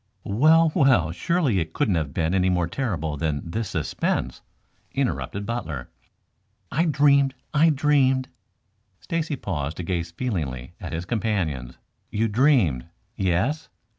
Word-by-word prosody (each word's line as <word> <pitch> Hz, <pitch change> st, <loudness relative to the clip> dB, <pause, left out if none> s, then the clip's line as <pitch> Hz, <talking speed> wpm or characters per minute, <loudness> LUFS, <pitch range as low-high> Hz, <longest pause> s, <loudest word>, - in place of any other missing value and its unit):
"Well, 155 Hz, +10 st, +4 dB
well, 130 Hz, -, +4 dB
surely 145 Hz, -, +1 dB
it 80 Hz, -1 st, -3 dB
couldn't 100 Hz, -, +1 dB
have 80 Hz, -4 st, -1 dB
been 80 Hz, +3 st, 0 dB
any 95 Hz, -1 st, +3 dB
more 90 Hz, -2 st, +1 dB
terrible 85 Hz, -, -2 dB
than 75 Hz, -1 st, -2 dB
this 110 Hz, +2 st, -2 dB
suspense," -, -, -2 dB, 0.5 s
interrupted 125 Hz, -6 st, -2 dB
Butler. 80 Hz, -, -4 dB, 0.8 s
"I 165 Hz, +6 st, +2 dB
dreamed 140 Hz, -3 st, +3 dB, 0.2 s
I 155 Hz, +2 st, +5 dB
dreamed 135 Hz, -3 st, +2 dB, 0.4 s
" 100 Hz, -1 st, -45 dB
Stacy 165 Hz, -3 st, -1 dB
paused 80 Hz, -, -4 dB
to 90 Hz, -, -4 dB
gaze 85 Hz, -1 st, -2 dB
feelingly 80 Hz, -, -4 dB
at -, -, -7 dB
his 85 Hz, +2 st, -3 dB
companions. 90 Hz, -, -2 dB, 0.3 s
"You 110 Hz, +2 st, 0 dB
dreamed? 110 Hz, -, +3 dB, 0.3 s
Yes?" 100 Hz, -, 0 dB
100 Hz, 135 wpm, -24 LUFS, 85-135 Hz, 0.8 s, I